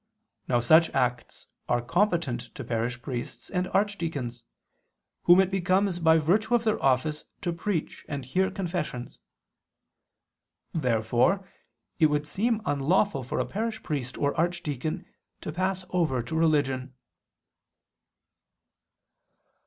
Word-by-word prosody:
Now 120 -2 +3
such 160 +7 +6
acts 125 -2 -1 0.2
are 120 - +3
competent 165 - +1
to 135 - -6
parish 120 +1 -2
priests 125 -4 -6
and 180 -1 0
archdeacons, 165 - -1 0.8
whom 175 +2 +8
it 190 0 +3
becomes 185 0 +1
by 160 -1 +5
virtue 200 +10 +2
of 235 - +2
their 220 -2 +1
office 135 +3 +1 0.2
to 175 -4 -1
preach 170 -1 -3
and 140 -3 -4
hear 185 +9 +1
confessions. 170 -9 -4 1.5
Therefore 125 - +1 0.5
it 160 - +6
would 150 0 0
seem 220 +6 0
unlawful 155 +4 +2
for 125 - -4
a - - +1
parish 220 +2 -3
priest 135 -6 -3
or 145 -1 +1
archdeacon 160 -4 -2 0.4
to - - -4
pass 185 +2 -1
over 155 -9 +1
to 120 - -5
religion. 135 -5 +1
160 Hz, 120 wpm, -27 LUFS, 130-185 Hz, 1.5 s, whom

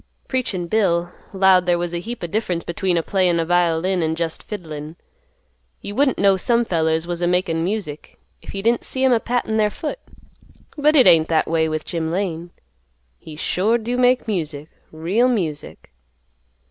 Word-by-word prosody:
Preachin' 225 -9 -2
Bill 175 -3 +1 0.2
"'lowed 190 -2 +4
there 175 -1 +3
was 175 0 -3
a 170 - -2
heap 230 +4 -7
o' - - 0
difference 175 -2 -2
between 180 0 -1
a 165 - 0
playin' 180 -3 +1
a 165 - 0
violin 175 +1 +1
an' 160 0 0
jest 165 -1 -3
fiddlin'. 155 -6 -7 0.8
You 200 - -7
wouldn't 265 +2 +2
know 195 -1 +4
some 235 +5 +1
fellers 160 -3 0
was 175 0 -4
a 175 - +1
makin' 175 -2 0
music, 180 -6 -4 0.2
if - - -10
you 195 - -4
didn't 235 +1 +2
see 260 - -3
'em 260 -1 +5
a 235 - +3
pattin' 235 -2 -1
their 210 -1 +3
foot; 305 - -5 0.8
but 300 0 +3
hit 265 - +7
ain't 160 -1 +6
that 160 -1 +2
a - - -9
way 160 -1 +2
with 155 0 -3
Jim 165 -2 -3
Lane. 175 -2 -3 0.7
He 155 - -11
sure 200 +8 +1
do 240 +2 -3
make 250 0 +2
music, 155 -7 -3 0.2
real 180 +10 +1
music." 165 -11 -4
180 Hz, 185 wpm, -21 LUFS, 165-220 Hz, 0.8 s, hit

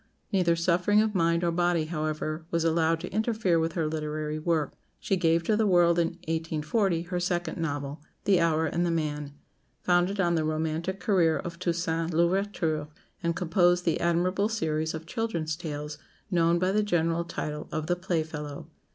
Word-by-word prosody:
Neither 175 -3 +3
suffering 180 +4 +3
of 215 0 +2
mind 170 -2 +2
or 170 - +2
body, 175 -1 +1
however, 155 0 -3
was 170 -1 0
allowed 165 0 +2
to 180 - -6
interfere 215 -5 +1
with 160 0 -1
her 165 -3 0
literary 155 0 -3
work. 155 -2 0 0.3
She 195 - 0
gave 165 -2 +2
to 215 - +2
the 215 0 +2
world 175 -2 +4
in 170 - +3 0.2
1840 165 +3 0
her 180 0 -3
second 175 -1 -2
novel, 145 -2 -3 0.2
"The 195 -3 +4
Hour 160 -1 +2
and 170 +3 0
the 175 - +1
Man," 150 -3 -2 0.5
founded 180 +3 +2
on 175 -2 +3
the 160 -2 +1
romantic 160 +4 -2
career 180 -8 +3
of 170 0 -6
Toussaint 165 -2 -1
L'Ouverture; 170 -3 +1 0.3
and 170 -1 0
composed 175 0 +2
the 165 - +1
admirable 180 +4 +1
series 160 -6 -1
of 160 0 -7
children's 170 -6 -2
tales, 150 -3 -6 0.3
known 170 -1 +3
by 185 +2 +1
the 210 +2 +2
general 170 -4 +1
title 150 -3 -5
of 155 -2 -2
"The 175 +2 +1
Playfellow." 155 -5 -3
170 Hz, 170 wpm, -28 LUFS, 160-180 Hz, 0.5 s, world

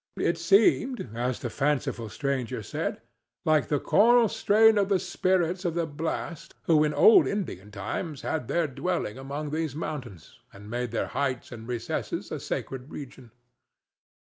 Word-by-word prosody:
It 170 - 0
seemed, 200 - +3
as 120 +2 -2
the 120 - -4
fanciful 135 -5 -1
stranger 135 -1 -2
said, - - -4 0.4
like 155 -3 +3
the 145 - +1
choral 235 - +5
strain 220 +2 +4
of 200 -1 +1
the 195 - +4
spirits 185 0 0
of 170 -3 -1
the 170 -1 +1
blast 160 +1 -5
who 155 -2 +4
in 150 - +1
old 395 - +6
Indian 160 - -4
times 110 - -5
had 155 -7 -2
their 170 -1 +1
dwelling 145 -4 -3
among 145 +2 -5
these 155 -2 -2
mountains 130 - -7
and 105 +2 -12
made 120 0 -2
their 115 - -2
heights 130 -3 -2
and 115 -1 -9
recesses 120 -2 -3
a - - -3
sacred 130 +1 -5
region. 130 -3 -9
150 Hz, 155 wpm, -27 LUFS, 125-175 Hz, 0.4 s, old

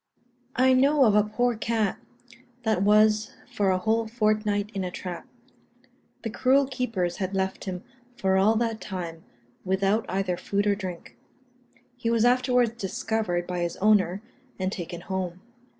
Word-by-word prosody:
I 260 +1 +4
know 275 +2 +4
of 215 - +4
a 210 - +6
poor 240 +3 0
cat 220 -2 -1 0.6
that 220 -5 +1
was 215 +1 +3 0.2
for 200 -2 +1
a 185 - +3
whole 220 +4 0
fortnight 215 -2 0
in 195 - -2
a 180 - -2
trap. 180 -1 -7 1.0
The 225 - -3
cruel 270 +4 +3
keepers 230 -10 -2
had 190 0 -3
left 190 0 -2
him 185 -1 -5 0.3
for 190 -3 +1
all 200 +4 +4
that 225 -1 -1
time, 170 -4 -6 0.4
without 195 +3 +1
either 185 -1 -1
food 200 +3 -1
or 205 - +3
drink; 180 -11 -7 0.8
he 230 - -2
was 230 0 +3
afterwards 250 -1 +3
discovered 205 -4 -2
by 180 0 -3
his 170 -1 -2
owner, 205 -1 +2 0.3
and 185 0 -1
taken 175 -2 -6
home. 185 -1 -4
205 Hz, 150 wpm, -26 LUFS, 185-225 Hz, 1.0 s, a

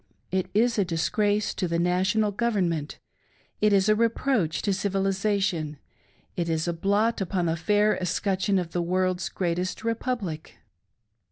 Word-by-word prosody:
It 185 0 -1
is 235 +1 +3
a - - +4
disgrace 205 +5 0
to 180 - -2
the 170 0 -1
National 185 +5 +1
Government; 190 -9 -1 0.6
it 210 0 +4
is 195 0 +4
a 215 - +5
reproach 225 - +1
to 200 - +1
Civilisation; 195 -5 0 0.6
it 170 -1 -2
is 160 +1 0
a 170 - 0
blot 205 +6 +1
upon 185 -1 -1
the 165 -1 +1
fair 210 +5 +2
escutcheon 190 +2 0
of 175 -2 -2
the 175 - -1
World's 185 +1 0
Greatest 180 +2 -2
Republic 230 -8 -3
190 Hz, 145 wpm, -26 LUFS, 175-210 Hz, 0.6 s, a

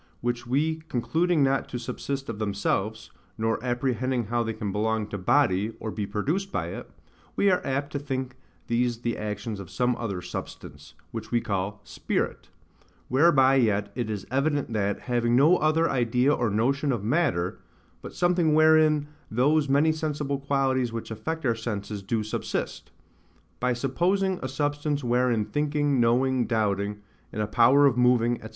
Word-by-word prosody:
which 120 0 -3
we 155 +5 +1
concluding 160 +6 +1
not 135 0 +1
to - - -4
subsist 135 +3 -4
of 115 -2 -5
themselves, 100 0 -2 0.3
nor 110 +1 -1
apprehending 125 0 -1
how 120 +3 0
they 115 -1 -1
can 105 -2 -4
belong 110 +1 0
to 105 - -7
body, 105 0 +2
or 110 - -4
be 105 -2 -4
produced 160 - -2
by - - -2
it, - - -8 0.5
we 200 - +3
are 180 - +2
apt 140 +2 -2
to 140 - -2
think 130 -3 -4 0.3
these 120 0 0
the 120 -1 -1
actions 105 0 -4
of 95 -4 -9
some 125 -1 0
other 100 -6 -3
SUBSTANCE, 75 -2 -8 0.2
which 115 - -6
we 120 - +2
call 100 -2 -3
SPIRIT; - - -3 0.6
whereby 135 -1 +5
yet 105 -6 +2
it 120 -3 -3
is 105 -3 -4
evident 140 -1 0
that, 100 -2 -1
having 120 -1 +1
no 155 +8 +5
other 155 +2 +2
idea 125 +1 +2
or 120 -5 0
notion 135 +7 +1
of 115 -6 -2
matter, 120 - 0 0.4
but - - -9
something 175 -3 +2
wherein 155 -1 +4 0.2
those 140 +5 +2
many 145 +4 +4
sensible 150 -3 -2
qualities 135 -3 0
which 115 0 -6
affect 160 +9 -4
our 120 - +3
senses 105 -3 -5
do 110 +3 -1
subsist; 105 - -4 0.7
by 125 0 +1
supposing 175 +10 0
a 130 - -3
substance 145 +1 -1
wherein 120 -2 +1
thinking, 145 +3 0
knowing, 125 +2 +2
doubting, 105 -2 -1 0.3
and 105 - -2
a - - 0
power 120 +6 +5
of 135 -3 +4
moving, 120 -1 +3
&c. 110 - -7
125 Hz, 165 wpm, -26 LUFS, 110-145 Hz, 0.7 s, whereby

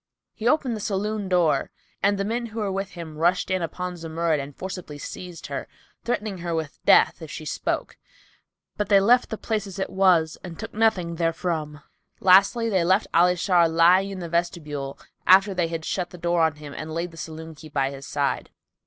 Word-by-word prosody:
He 225 - -3
opened 260 -4 +2
the - - -5
saloon 205 0 -2
door 170 -6 +2 0.3
and 200 0 +3
the 195 - -1
men 235 +3 -2
who 225 0 -7
were 205 -2 -1
with 195 +1 -3
him 160 -3 -8
rushed 175 +3 +2
in 185 -1 +1
upon 180 +2 -4
Zumurrud 165 -1 -1
and 140 0 -7
forcibly 180 -5 -6
seized 175 +3 -8
her, - - -5 0.4
threatening 210 -5 -2
her 170 -1 -2
with 160 -2 -4
death, - - +5
if 160 - -8
she 160 -1 -7
spoke, - - -3 0.8
but 210 - -2
they 200 -1 +7
left 240 +5 +4
the 220 - -4
place 215 -2 -2
as 190 -1 -9
it 190 - -3
was 185 -5 +3
and 170 -3 -8
took - - -7
nothing 195 -7 +1
therefrom. 160 -3 -2 0.4
Lastly 200 +5 +5
they 190 -6 +2
left 190 +5 +3
Ali 180 +2 +5
Shar 175 -1 +3
lying 175 +4 +5
in 195 - -6
the 170 - -4
vestibule 155 -5 -2 0.3
after 195 +2 +6
they 175 -2 0
had 165 -1 -5
shut 180 -2 -2
the 180 - -11
door 170 0 +1
on 160 -2 +2
him 150 -1 -10
and 155 +1 -6
laid 170 +1 -2
the - - -14
saloon 160 0 -7
key 155 +1 -13
by 135 -2 0
his 135 0 -9
side. 140 -1 -1
175 Hz, 205 wpm, -24 LUFS, 160-195 Hz, 0.8 s, they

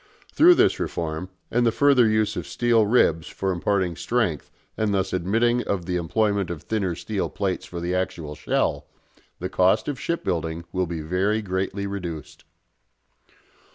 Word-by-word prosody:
Through 350 +3 +7
this - - +3
reform, 80 +2 -3 0.2
and 120 +1 +2
the 115 - +3
further 135 -3 +4
use 110 0 +1
of - - -5
steel 115 -3 +2
ribs 85 -8 +3
for 95 0 -2
imparting 90 0 0
strength 90 - -1 0.3
and 110 -1 0
thus 95 0 -1
admitting 115 +7 +2
of 95 -4 -2
the 90 0 -2
employment 100 +2 0
of 85 -4 -6
thinner 100 -6 -1
steel 95 +4 -3
plates 95 -2 -3
for 85 - -6
the 85 +1 -2
actual 85 -5 -3
shell, - - -1 0.5
the 90 - -3
cost 95 +3 +2
of 145 -4 -3
shipbuilding 85 - -2
will 90 -1 -1
be 80 -1 -4
very 95 +7 0
greatly 95 +1 -2
reduced. 90 -6 -6
95 Hz, 155 wpm, -24 LUFS, 85-110 Hz, 0.5 s, Through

